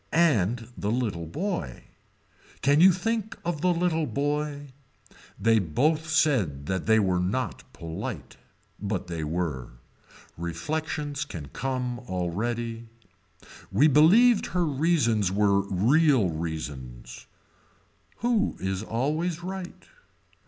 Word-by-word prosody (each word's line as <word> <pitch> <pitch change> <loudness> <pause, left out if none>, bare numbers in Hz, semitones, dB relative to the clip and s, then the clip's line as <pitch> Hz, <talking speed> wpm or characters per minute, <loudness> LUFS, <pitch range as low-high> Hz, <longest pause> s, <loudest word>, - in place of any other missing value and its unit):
And 120 - +2
the 100 - -3
little 105 -8 -1
boy. 120 - -4 0.8
Can 145 +3 +4
you 190 +2 +9
think 220 +4 -2
of 170 -4 -2
the 180 +1 +3
little 165 -2 0
boy. 145 0 -2 0.7
They 115 +1 +4
both 150 - 0
said 115 - +1
that 95 +3 -2
they 110 0 +5
were 95 -4 +2
not 95 +4 -3
polite. 80 -1 -6 0.5
But 100 -2 -2
they 85 -3 -4
were. 75 -6 -3 0.7
Reflections 145 - -3
can 85 - -8
come 125 -2 -3
already. 115 +6 -3 0.8
We 115 +11 +5
believed 200 - +5
her 180 -1 0
reasons 140 - +2
were 100 0 +3
real 125 - +3
reasons. 75 -7 -6 0.9
Who 235 -3 +1
is 95 0 -2
always 155 +10 -2
right. 185 0 -6
120 Hz, 110 wpm, -26 LUFS, -, 0.9 s, you